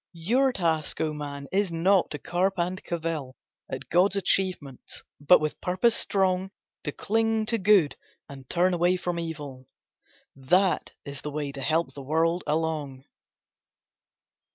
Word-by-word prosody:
Your 240 +11 +2
task, 165 -8 -1
O 155 -1 0
man, 140 -1 -6
is 195 -1 +1
not 180 +3 +3
to 150 - -5
carp 185 +5 0
and 180 +2 -2
cavil 160 -6 -4 0.3
At - - -6
God's 180 +4 +3
achievements, 185 -9 -1 0.2
but 145 +5 +6
with 155 0 -3
purpose 185 +6 +2
strong 190 -1 +1 0.4
To 150 - -1
cling 225 +4 0
to 230 +1 -1
good, 195 -6 +4 0.3
and 135 -2 -12
turn 180 +2 +2
away 175 +1 +2
from 175 -1 -3
evil. 145 -6 -7 0.7
That 180 +8 +1
is 140 -1 -7
the 150 - -5
way 145 -1 -3
to 140 -1 -8
help 160 +5 0
the 140 - -8
world 165 +5 +1
along. 150 -4 -2
170 Hz, 145 wpm, -26 LUFS, 150-185 Hz, 0.7 s, but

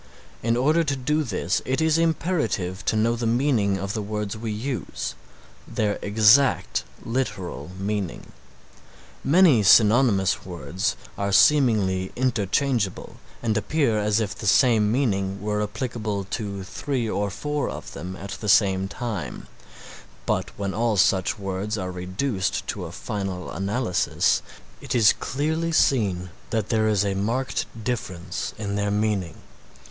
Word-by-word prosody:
In 115 +1 +1
order 155 +6 +3
to 145 -3 -1
do 150 +4 0
this 95 - -1
it 130 +3 -1
is 160 0 +3
imperative 160 - 0
to - - +1
know 115 +2 +2
the 115 -1 -2
meaning 115 -5 +2
of 100 +1 -4
the 110 - -2
words 105 0 -3
we 110 0 -4
use, 120 +4 -4 0.5
their 110 -3 -1
exact 110 +6 +4 0.2
literal 105 -8 -3
meaning. 100 -2 -3 0.9
Many 150 - +5
synonymous 105 -1 +5
words 85 0 -3 0.2
are 100 0 0
seemingly 100 -6 +4
interchangeable 120 -2 0 0.3
and 110 -2 +1
appear 115 0 +1
as 105 +1 +2
if 105 -2 -1
the 105 - -6
same 110 -1 +4
meaning 100 -6 0
were 105 +1 -1
applicable 105 -2 -3
to 100 -4 -3
three 125 +4 -3
or 105 -1 -1
four 145 +10 -2
of - - -7
them 90 +2 -6
at 95 +1 -8
the 105 - -2
same 95 -4 +4
time, 110 -3 -5 0.8
but - - 0
when 100 -1 -2
all 115 -1 +1
such 95 +1 +2
words 100 +2 -3
are 90 -2 -3
reduced 95 +4 -2
to - - -3
a - - -7
final 95 -3 -4
analysis 100 +1 +1 0.4
it - - -3
is 110 -3 +6
clearly 160 +5 -2
seen 100 - +2 0.2
that 110 -3 -1
there 110 -2 +2
is 105 -2 +2
a 100 - 0
marked 115 +7 -1 0.2
difference 95 -6 -4
in 100 -2 -3
their 100 0 0
meaning. 100 -5 0
105 Hz, 140 wpm, -24 LUFS, 95-125 Hz, 0.9 s, is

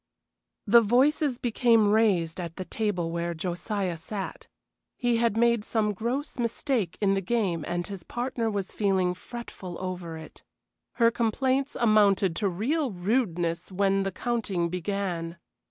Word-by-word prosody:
The 235 +3 +7
voices 260 +4 +3
became 230 -3 +3
raised 190 -7 +2
at 170 -2 -5
the 185 - -5
table 180 -7 -1
where 170 0 -2
Josiah 180 +2 -2
sat. 195 +4 -6 0.5
He 240 -1 +1
had 230 -2 +1
made 235 -2 +3
some 215 -1 0
gross 245 +8 -3
mistake 235 - -1
in 195 -2 +3
the 195 - 0
game 190 -6 0
and 175 0 -2
his 195 -3 -7
partner 240 +3 -2
was 200 -3 -3
being 190 -3 +1
fretful 185 -3 -8
over 180 -3 -5
it. 160 -1 -12 0.5
Her 230 0 +4
complaints 260 +4 0
amounted 205 -5 +4
to 205 -3 +1
real 265 - 0
rudeness 180 -4 -1
when 195 +1 +2
the 195 0 -1
counting 200 -6 -1
began. 180 -2 -3
200 Hz, 140 wpm, -27 LUFS, 180-235 Hz, 0.5 s, The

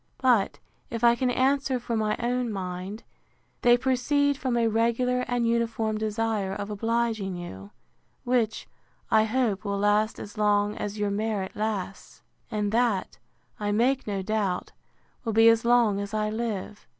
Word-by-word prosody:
But, 240 -6 +2 0.3
if 230 0 -5
I 235 0 +7
can 250 +1 0
answer 265 +1 +1
for 235 -1 -3
my 215 -1 +1
own 245 0 -1
mind, 190 +2 -5 0.6
they 240 0 +6
proceed 280 +3 +1
from 260 -3 -1
a 230 -1 +3
regular 235 +3 +1
and 245 -2 0
uniform 225 -2 0
desire 215 -2 -1
of 205 +1 -5
obliging 225 -2 -1
you: 100 - -8 0.5
which, 240 -3 0 0.4
I 220 -1 +5
hope, 220 -4 0
will 200 -1 -2
last 205 +2 +2
as 205 +1 -9
long 205 0 +2
as 210 0 -4
your 205 -1 0
merit 205 -2 -2
lasts; 210 -3 -4 0.3
and 210 -3 -1
that, 225 -4 0 0.4
I 205 -1 -1
make 250 +5 +1
no 200 -2 -2
doubt, 200 -3 -1 0.5
will 225 -3 -2
be 225 +1 +6
as 230 0 +3
long 235 -4 +4
as 200 +1 -4
I 215 0 0
live. 215 -2 -4
220 Hz, 155 wpm, -26 LUFS, 205-240 Hz, 0.6 s, I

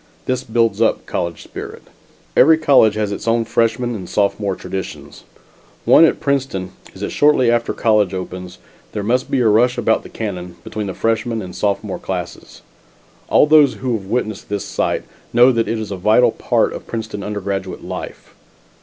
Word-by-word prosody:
This 130 0 -1
builds 115 -2 0
up 115 - +1
college 85 -2 -3
spirit. - - -9 0.5
Every 160 +3 +6
college 135 -9 +4
has 105 -1 -1
its 100 - -6
own 115 0 +2
freshman 115 +1 0
and 95 -5 -7
sophomore 100 -1 0
traditions; 95 0 -7 0.6
one 165 - +7
at - - +1
Princeton 130 -10 -1 0.2
is, - - -11
that - - -3
shortly 145 -5 +3
after 120 0 +1
college 105 -4 +2
opens 90 -1 -6 0.4
there 105 - -3
must 125 +5 0
be 130 - +1
a 115 - +3
rush 120 +4 +3
about 115 -1 +2
the - - -12
cannon, 90 -5 -5
between 105 +2 -5
the 95 - -5
freshman 115 0 -1
and 90 -3 -7
sophomore 100 -1 -2
classes. - - -6 0.7
All - - +5
those 150 -3 +5
who 130 -2 -2
have 105 -4 -3
witnessed 110 -2 -3
this 100 -1 -3
sight, - - -1 0.3
know 120 +2 +6
that 115 -2 0
it 115 - -1
is 110 -2 -5
a 100 - -3
vital 110 +6 +4
part - - 0
of - - -9
Princeton 110 -3 -5
undergraduate 100 -2 -4
life. - - -8
110 Hz, 175 wpm, -19 LUFS, 100-120 Hz, 0.7 s, one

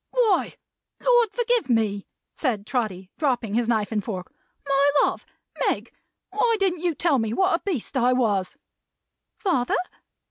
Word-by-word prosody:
"Why, 465 -6 +2 0.4
Lord 485 -3 +4
forgive 480 - 0
me!" 215 -4 +1 0.3
said 225 -8 -1
Trotty, 200 -7 -3
dropping 245 -8 0
his 235 +1 +1
knife 220 -3 0
and 210 -2 -1
fork. 185 -4 -6 0.3
"My 280 +1 +4
love! - - -1 0.4
Meg! - - -1 0.4
why 450 +3 +2
didn't 365 -4 +1
you 345 -3 0
tell 290 -2 +2
me 225 -1 -1
what 375 +7 +2
a 335 - +1
beast 310 - -3
I 250 -1 +3
was?" 220 -3 0 0.8
"Father?" 335 - +1
260 Hz, 145 wpm, -24 LUFS, -, 0.8 s, Lord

